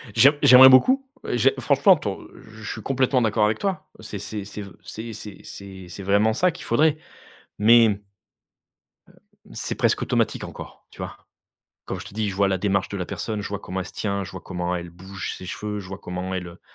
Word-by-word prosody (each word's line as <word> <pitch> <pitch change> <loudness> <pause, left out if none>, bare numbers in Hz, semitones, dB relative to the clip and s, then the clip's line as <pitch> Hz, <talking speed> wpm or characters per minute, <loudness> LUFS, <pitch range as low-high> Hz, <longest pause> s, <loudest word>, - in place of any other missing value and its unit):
J'aim 140 +3 +7
j'aimerais 130 +1 +10
beaucoup 260 - +5 0.2
et - - 0
j'ai 130 +3 +4
franchement, 145 +8 +5
ton 100 -10 -5 0.3
je 110 +1 -12
suis 110 - -6
complètement 130 +2 +1
d'accord 110 -1 +2
avec 105 +1 0
toi, 190 -5 -3
c'est 110 -2 -7
c'est 105 0 -6
c'est 105 +1 -8
v 100 -1 -9
c'est 115 +1 -7
c'est 105 -1 -9
c'est 95 -2 -10
c'est 95 +3 -8
vraiment 100 +3 +3
ça 180 +10 +2
qu'il 165 - -11
faudrait, 155 +5 +3 0.6
mais 115 +2 +7
hem, 105 -2 0 1.5
c'est - - -4
presque - - +1
automatique - - 0
encore, - - -10
tu - - -18
vois? - - -6 0.7
Comme - - -4
je - - -8
te - - -11
dis, 110 -1 -1
je 95 - -4
vois 100 0 +2
la 95 -1 0
démarche 100 +1 0
de 100 - -4
la 90 - -3
personne, 110 -2 -4
je 100 - -5
vois 100 0 -4
comment 95 -1 -5
elle 90 - -5
se - - -11
tient, 100 -2 -2
je - - -9
vois 95 - -7
comment 90 -1 -3
elle 85 0 -7
bouge 95 +3 -7
ses 95 - -9
cheveux. 105 +3 -4
Je 95 - -10
vois 95 - -6
comment 90 +1 -5
elle, 90 -1 -4
heu, 85 +1 -14
105 Hz, 220 wpm, -23 LUFS, 95-120 Hz, 1.5 s, j'aimerais